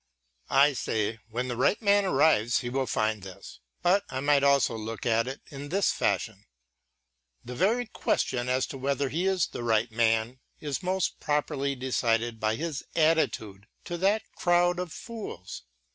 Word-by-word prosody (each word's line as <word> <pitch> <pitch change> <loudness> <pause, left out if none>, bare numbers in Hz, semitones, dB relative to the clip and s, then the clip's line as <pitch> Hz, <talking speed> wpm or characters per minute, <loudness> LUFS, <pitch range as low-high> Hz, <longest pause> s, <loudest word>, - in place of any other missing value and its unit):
I 140 +2 +5
say, 110 -3 -2
when 125 +3 -3
the 120 - -3
right 130 - +2
man 205 -2 +3
arrives 135 - +3
he 120 - -4
will 135 0 -1
find 110 -1 0
this; 95 0 -11 0.2
but 190 +3 +3
I 130 - -3
might 145 0 +3
also 140 -4 +3
look 110 +1 -6
at 115 0 +2
it 135 +2 -6
in 145 0 -7
this 195 +4 +2
fashion: 105 -3 -2 1.0
the 125 - -6
very 215 - +1
question 125 - -1
as 130 +1 +1
to 135 - -7
whether 140 +1 0
he 170 +7 -1
is 190 -4 +2
the - - -7
right 115 0 +1
man 115 +2 +1 0.2
is 145 -3 -3
most 185 0 -1
properly 145 -2 -1
decided 120 -3 0
by 110 0 +1
his 155 +1 -4
attitude 130 - +1 0.2
to 175 - -4
that 200 +4 +2
crowd 175 0 +2
of 180 -2 -4
fools. 215 - -8
135 Hz, 165 wpm, -28 LUFS, 115-165 Hz, 1.0 s, I